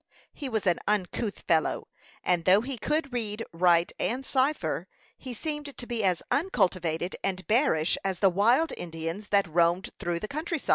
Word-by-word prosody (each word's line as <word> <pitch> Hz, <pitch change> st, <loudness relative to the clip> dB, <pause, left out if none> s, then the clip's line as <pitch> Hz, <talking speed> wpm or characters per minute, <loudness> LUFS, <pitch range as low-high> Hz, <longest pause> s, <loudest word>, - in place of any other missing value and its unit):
He 280 Hz, -4 st, -5 dB
was 220 Hz, -4 st, -1 dB
an 175 Hz, -3 st, +3 dB
uncouth 205 Hz, +1 st, -1 dB
fellow, 160 Hz, -2 st, +1 dB, 0.4 s
and 175 Hz, -2 st, +1 dB
though 190 Hz, +3 st, +6 dB
he 265 Hz, +3 st, -4 dB
could 290 Hz, +2 st, -1 dB
read, 225 Hz, -2 st, -2 dB
write, 170 Hz, 0 st, +4 dB
and 260 Hz, +3 st, -1 dB
cipher, 260 Hz, -, 0 dB, 0.3 s
he 260 Hz, -, -8 dB
seemed 295 Hz, +3 st, -5 dB
to 245 Hz, -, -5 dB
be 235 Hz, -3 st, -2 dB
as 185 Hz, -3 st, +1 dB
uncultivated 180 Hz, -, 0 dB
and 185 Hz, -1 st, -2 dB
bearish 215 Hz, -, +2 dB
as 190 Hz, -2 st, -1 dB
the 195 Hz, +1 st, +4 dB
wild 235 Hz, -, +3 dB
Indians 165 Hz, +4 st, -5 dB
that 200 Hz, -2 st, +3 dB
roamed 170 Hz, +3 st, +2 dB
through 175 Hz, -1 st, -2 dB
the 215 Hz, -, -5 dB
country. 320 Hz, +6 st, -3 dB
200 Hz, 170 wpm, -28 LUFS, 175-255 Hz, 0.4 s, though